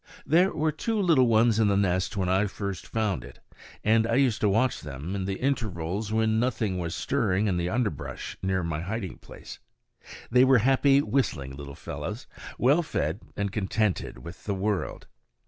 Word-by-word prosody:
There 175 Hz, +5 st, +4 dB
were 155 Hz, +1 st, 0 dB
two 220 Hz, +8 st, -2 dB
little 160 Hz, -10 st, +4 dB
ones 115 Hz, 0 st, +4 dB
in 110 Hz, -, +4 dB
the 100 Hz, -1 st, +2 dB
nest 95 Hz, 0 st, 0 dB
when 95 Hz, -2 st, 0 dB
I 95 Hz, +3 st, +2 dB
first 100 Hz, -1 st, -5 dB
found 105 Hz, -, -1 dB
it; -, -, -12 dB, 0.5 s
and 110 Hz, +1 st, +3 dB
I 115 Hz, -, +1 dB
used 130 Hz, -5 st, +2 dB
to 105 Hz, -, +3 dB
watch 115 Hz, +6 st, +1 dB
them 75 Hz, +4 st, -6 dB
in 95 Hz, -1 st, -2 dB
the 95 Hz, 0 st, -2 dB
intervals 105 Hz, -6 st, -2 dB
when 110 Hz, 0 st, +2 dB
nothing 110 Hz, -6 st, 0 dB
was 85 Hz, -1 st, -3 dB
stirring 105 Hz, -7 st, 0 dB
in 95 Hz, -4 st, +1 dB
the 85 Hz, 0 st, -1 dB
underbrush 110 Hz, -, -3 dB
near 95 Hz, -1 st, 0 dB
my 85 Hz, -1 st, -2 dB
hiding 100 Hz, +1 st, -4 dB
place. -, -, -11 dB, 0.7 s
They 125 Hz, +1 st, +6 dB
were 130 Hz, 0 st, +6 dB
happy, 135 Hz, +4 st, +4 dB
whistling, 75 Hz, -, -1 dB
little 70 Hz, 0 st, -8 dB
fellows, -, -, -6 dB, 0.3 s
well 140 Hz, +7 st, +4 dB
fed 80 Hz, -, -2 dB, 0.2 s
and 100 Hz, -1 st, -1 dB
contented 100 Hz, -, -1 dB
with 85 Hz, -, -10 dB
the 100 Hz, -, -1 dB
world. 100 Hz, 0 st, -2 dB
105 Hz, 180 wpm, -27 LUFS, 90-125 Hz, 0.7 s, They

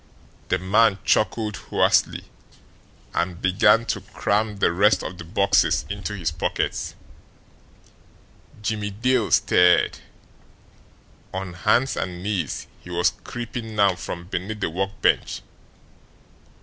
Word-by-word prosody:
The 90 Hz, -, +2 dB
man 100 Hz, +3 st, +3 dB
chuckled 110 Hz, -2 st, +1 dB
hoarsely, -, -, +1 dB, 0.9 s
and 85 Hz, 0 st, -1 dB
began 105 Hz, +4 st, +4 dB
to -, -, -2 dB
cram 105 Hz, 0 st, -1 dB
the 100 Hz, -, +2 dB
rest 100 Hz, +5 st, +3 dB
of 90 Hz, -, -7 dB
the -, -, -6 dB
boxes 100 Hz, +3 st, +2 dB
into 100 Hz, +1 st, -4 dB
his 85 Hz, -4 st, -2 dB
pockets. 80 Hz, -, -2 dB, 1.7 s
Jimmie 105 Hz, -1 st, -2 dB
Dale 115 Hz, +2 st, +1 dB
stirred. 90 Hz, 0 st, +4 dB, 1.3 s
On 95 Hz, -1 st, -5 dB
hands 105 Hz, +9 st, +2 dB
and 90 Hz, -1 st, -4 dB
knees 95 Hz, -7 st, -2 dB, 0.2 s
he -, -, -12 dB
was 85 Hz, 0 st, +1 dB
creeping 115 Hz, -2 st, -6 dB
now 100 Hz, -2 st, +4 dB
from 85 Hz, 0 st, -7 dB
beneath 95 Hz, +4 st, -4 dB
the 80 Hz, -, -1 dB
workbench. 95 Hz, +3 st, 0 dB
100 Hz, 110 wpm, -23 LUFS, 90-110 Hz, 1.7 s, began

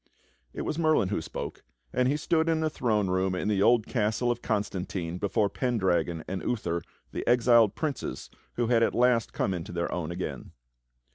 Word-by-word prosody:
It -, -, -5 dB
was 155 Hz, -, -2 dB
Merlin 155 Hz, -, +3 dB
who -, -, -1 dB
spoke, 80 Hz, -, -6 dB, 0.3 s
and 125 Hz, -, +2 dB
he 140 Hz, +3 st, +1 dB
stood 160 Hz, +2 st, +1 dB
in 160 Hz, -1 st, +1 dB
the 155 Hz, -1 st, 0 dB
throne 105 Hz, -8 st, 0 dB
room 95 Hz, 0 st, +1 dB
in 90 Hz, -, -2 dB
the 100 Hz, -2 st, +1 dB
old 115 Hz, +1 st, +4 dB
castle 110 Hz, +1 st, 0 dB
of 120 Hz, 0 st, -3 dB
Constantine, 95 Hz, -4 st, -2 dB
before 105 Hz, +2 st, +1 dB
Pendragon 95 Hz, -8 st, 0 dB
and 95 Hz, 0 st, -3 dB
Uther, 85 Hz, -8 st, -1 dB, 0.3 s
the -, -, -4 dB
exiled 120 Hz, -3 st, +5 dB
princes 155 Hz, -4 st, -4 dB, 0.2 s
who 120 Hz, -, 0 dB
had 115 Hz, 0 st, +3 dB
at 115 Hz, -, +2 dB
last 120 Hz, -2 st, +3 dB
come 95 Hz, -, -1 dB
into 85 Hz, -2 st, -5 dB
their 85 Hz, 0 st, -2 dB
own 85 Hz, -3 st, -3 dB
again. 85 Hz, +2 st, -5 dB
110 Hz, 185 wpm, -28 LUFS, 95-125 Hz, 0.3 s, exiled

